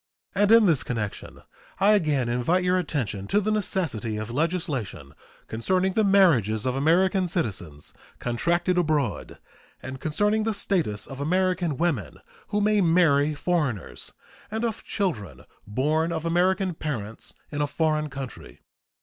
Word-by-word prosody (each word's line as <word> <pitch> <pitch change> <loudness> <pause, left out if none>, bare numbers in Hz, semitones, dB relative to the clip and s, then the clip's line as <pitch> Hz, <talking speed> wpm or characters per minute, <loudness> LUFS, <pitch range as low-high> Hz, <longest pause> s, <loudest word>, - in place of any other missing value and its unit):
And 205 +1 +3
in 230 -1 +7
this 165 -7 +3
connection 110 -4 -5 0.4
I 200 +2 +5
again 150 - +2
invite 125 +10 +1
your 180 0 +2
attention 115 - -3
to 205 - +3
the 215 +1 -1
necessity 165 - -1
of 110 +2 -5
legislation 135 - -2 0.3
concerning 185 +12 0
the 220 - +2
marriages 150 - +4
of 130 0 0
American 180 +6 +2
citizens 100 - -4 0.2
contracted 170 +9 0
abroad, 150 - -1 0.4
and 130 0 -8
concerning 205 +8 +1
the 220 0 -1
status 165 - -1
of 135 0 -8
American 180 -1 0
women 160 - -1 0.3
who 210 - 0
may 210 0 +3
marry 155 -4 +3
foreigners 145 - -2 0.4
and 220 +2 -2
of 225 -2 -3
children 160 - -3 0.2
born 155 +9 0
of 160 -1 -3
American 180 +2 +1
parents 115 -9 -5 0.2
in 145 -1 -2
a 145 - +1
foreign 155 0 0
country. 135 -2 -8
160 Hz, 140 wpm, -25 LUFS, 125-185 Hz, 0.4 s, in